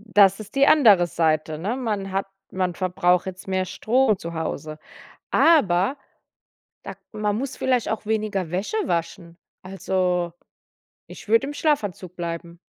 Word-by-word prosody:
Das 195 -1 +6
ist 215 +4 -11
die 275 +1 +5
andere 210 - +6
Seite, 155 -2 0
ne? 210 +10 -2
Man 210 -6 -3
hat 195 +1 -1 0.3
man 185 -2 -1
verbraucht 180 0 +1
jetzt 185 0 -8
mehr 190 -1 0
Strom 225 +2 +1
zu 170 -1 -7
Hause, 155 -1 -4 0.5
aber 235 - +3 0.9
da - - -7
k - - -38
man 210 -1 -1
muss 265 +3 -4
vielleicht 255 -3 0
auch 220 -1 -4
weniger 210 -5 -1
Wäsche 190 - -2
waschen. 170 0 -3 0.3
Also, 185 -2 -1 0.7
ich - - -12
würde 230 +5 +3
im 290 - -5
Schlafanzug 205 - -1
bleiben. 170 0 -6
190 Hz, 145 wpm, -23 LUFS, 175-220 Hz, 0.9 s, Das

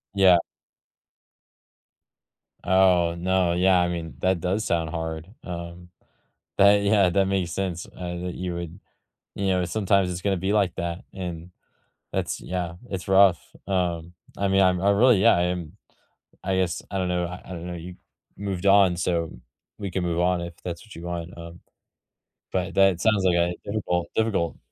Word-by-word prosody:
Yeah. 95 -3 +6 2.3
Oh, 90 -3 +4
no, 90 0 +1
yeah, 90 +1 +4
I 90 0 +1
mean, 85 -2 -5
that 95 -1 +1
does 95 +5 -1
sound 80 -2 0
hard. 80 0 -4 0.2
Um, 85 0 -7 0.7
that 100 +1 +6
yeah, 100 -2 +4
that 95 +1 +2
makes 95 -3 -1
sense, 90 -1 -3
uh, 90 -1 -6
that 90 - -4
you 90 -1 -4
would 85 +2 -7 0.5
you 100 - -2
know, 90 -1 +2
sometimes 100 -1 +1
it's 90 0 -5
gonna 100 -1 +1
be 95 +3 -1
like 100 -3 +2
that 85 +1 -3
and 90 -2 -6 0.6
that's - - -2
yeah, 90 -2 -4 0.2
it's 95 -3 -5
rough. 95 -3 +5 0.3
Um, 85 -3 -1 0.2
I 100 - 0
mean, 95 0 +4
I'm 90 -1 +3
I 100 +2 +3
really, 110 +1 +5
yeah, 115 -1 +6
I 85 - +2
am, 90 -3 -3 0.7
I 95 0 0
guess, 90 -3 0
I 100 - -2
don't 90 -1 0
know 90 -1 0
I 90 +1 -8
I - - -16
don't 85 -1 -6
know, 90 - -5
you 85 +1 -8 0.4
moved 100 -2 -4
on, 95 -3 +5
so 85 -1 0
m - - -12 0.4
we 100 -2 -4
can 90 +1 -2
move 85 -1 0
on 90 0 +2
if 85 0 -6
that's 85 +2 -5
what 110 - -13
you 85 - -9
want, 85 -1 -4
um, 85 +1 -10 0.9
but 90 -1 -2
that 95 -3 +4
sounds 105 -2 +3
like 90 -2 +4
a 85 0 +2
difficult, 90 -5 -1
difficult 100 -7 0
90 Hz, 175 wpm, -25 LUFS, 85-95 Hz, 2.3 s, Yeah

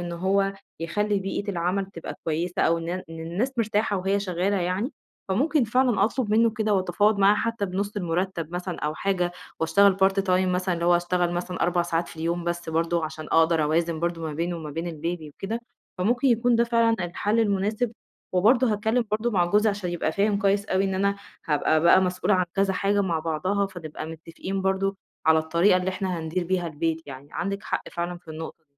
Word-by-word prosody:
إن 175 0 -4
هو 195 +3 +1 0.3
يخلي 205 +4 0
بيئة 195 +1 -3
العمل 185 +2 -1
تبقى 170 -4 -8
كويسة 165 +3 -1
أو 165 0 +3
إن 165 - -6
إن 180 +1 -3 0.2
الناس 180 +11 -2
مرتاحة 210 -2 +1
وهي 195 +2 0
شغالة 190 +1 0
يعني، 185 - -1 0.4
فممكن 285 +8 +2
فعلًا 230 -3 +2
أطلب 230 -1 -1
منه 230 +1 +4
كده 215 -2 0
وأتفاوض 200 +3 +2
معاه 200 +1 +6
حتى 230 -2 -1
بنُص 200 +3 -3
المُرتَب 175 -2 -2
مثلًا 180 0 -4
أو 150 +1 -2
حاجة 180 -2 0 0.3
وأشتغل 190 +4 +4
Part-time 195 0 +2 0.3
مثلًا 180 0 0
اللي 170 0 -3
هو 175 0 +5
اشتغل 175 0 0
مثلًا 180 +1 -3
4 175 0 +2
ساعات 170 0 -1
في - - -12
اليوم 170 +2 -2
بس، 175 -1 -3
برضه 165 +1 0
عشان 155 0 -6
أقدر 165 -1 +4
أوازن 165 +1 0
برضه 170 -1 -2
ما 155 -2 -3
بينه 170 +3 -2
وما 155 -2 -6
بين 165 +3 -3
الBaby 165 0 -4
وكده، 225 +4 -4 0.4
فممكن 240 +8 +2
يكون 240 0 +3
ده 235 - +4
فعلًا 230 -1 +3
الحل 205 +6 0
المناسب 215 +3 0 0.4
وبرضه 225 +5 +4
هاتكلم 220 +3 +1
برضه 220 +3 0
مع 180 -4 +3
جوزي 210 +5 +3
عشان 200 -3 -4
يبقى 170 -2 -1
فاهم 200 0 +1
كويس 200 0 +2
أوي 190 +1 +1
إن 190 -1 -1
أنا 200 +1 +1 0.3
هابقى 155 +1 +2
بقى 170 +3 +6
مسؤولة 185 +2 +1
عن 185 -1 +2
كذا 195 0 +2
حاجة 200 +2 +1
مع 170 -4 0
بعضها، 185 +6 0
فنبقى 160 -4 -7
متفقين 165 +4 -5
برضه، 195 0 0 0.3
على 160 0 +6
الطريقة 170 +5 +3
اللي 185 0 -1
إحنا 185 -2 -2
هندير 165 +3 -2
بيها 180 -1 0
البيت 160 +1 -2
يعني. 140 +1 -10
عندِك 200 +3 -3
حق - - -3
فعلًا 175 0 -3
في 165 - -26
النقطة 160 +1 -8
185 Hz, 195 wpm, -25 LUFS, 170-205 Hz, 0.4 s, معاه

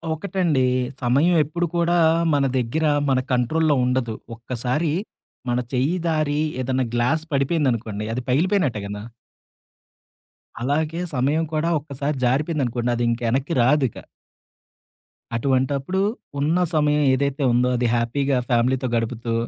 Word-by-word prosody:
ఒకటండి. 165 -6 0 0.4
సమయం 140 +8 +3
ఎప్పుడు 170 +4 -2
కూడా 170 0 +2 0.4
మన 140 -1 +2
దగ్గర, 130 +6 0 0.2
మన 130 -1 +3
కంట్రోల్‌లో 150 +5 +2
ఉండదు. 125 -3 -1 0.2
ఒక్కసారి 125 +6 -2 0.6
మన 120 +1 +1
చెయ్యి 135 +8 +1
జారి 155 -2 0 0.2
ఏదన్నా 130 0 0
గ్లాసు 150 +7 +1
పడిపోయిందనుకోండి, 125 -8 0
అది 125 - -2
పగిలిపోయినట్టే 155 - +1
గదా! 105 0 -6 1.6
అలాగే 155 +5 -1
సమయం 145 +6 +1
కూడా 155 +2 0
ఒక్కసారి 140 0 -4
జారిపోయిందనుకోండి, 125 -3 0
అదింక 120 0 0
ఎనక్కి‌ 135 +5 -1
రాదిక. 130 -2 +2 1.4
అటువంటప్పుడు 135 +7 0 0.4
ఉన్న 155 +5 +1 0.2
సమయం 150 -1 +2
ఏదైతే 140 +1 0
ఉందో 125 +1 +3
అది 120 0 +1
హ్యాపీగా 130 +3 0
ఫ్యామిలీతో 125 +2 +1
గడుపుతూ 115 0 -2
135 Hz, 110 wpm, -22 LUFS, 125-155 Hz, 1.6 s, సమయం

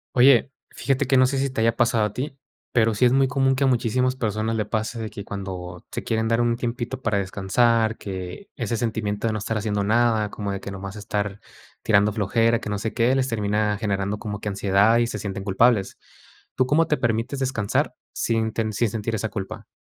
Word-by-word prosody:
Oye, 130 +1 +6 0.2
fíjate 135 0 0
que 130 +1 +3
no 130 - +6
sé 135 +1 -1
si 135 0 0
te 115 - -2
haya 115 0 +3
pasado 115 -2 +2
a 105 - -4
ti, 135 +1 -4 0.3
pero 115 -2 +3
sí 125 - +3
es 120 - +5
muy 135 0 +4
común 135 0 +2
que 135 - 0
a - - +3
muchísimas 125 +1 +1
personas 110 -2 -1
le 110 -1 -1
pase 110 +2 -2
de 110 -1 -4
que 100 - -7
cuando 90 -3 -7
se - - -4
quieren 110 0 0
dar 115 +1 +2
un 120 0 +2
tiempito 120 +2 -4
para 110 -4 0
descansar, 110 +4 +1
que 95 - -7
ese 115 -3 -2
sentimiento 110 -2 -2
de 110 - 0
no 110 - -2
estar 110 +2 -2
haciendo 105 -1 -1
nada, 110 0 +2
como 100 -2 -4
de 100 - -3
que 100 - -7
nomás 100 +1 -7
estar 100 -1 -3 0.4
tirando 105 -1 +4
flojera, 115 +3 +2
que - - -6
no 105 -1 -2
sé 110 +2 -3
qué, 120 +2 +2
les 130 -1 +1
termina 105 -2 0
generando 100 -1 -1
como 105 -2 -5
que 105 - -3
ansiedad 100 +3 +3
y 120 - +3
se 105 -3 -4
sienten 100 -1 -4
culpables. 100 +1 +2 0.6
¿Tú 130 - +2
cómo 155 +5 +3
te 150 - +1
permites 120 +2 -1
descansar 125 -6 0 0.2
sin 115 -1 0
ten 110 -1 -1
sin 115 +2 +1
sentir 110 +1 -3
esa 110 +1 -2
culpa? 95 -2 -6
110 Hz, 220 wpm, -24 LUFS, 105-120 Hz, 0.6 s, Oye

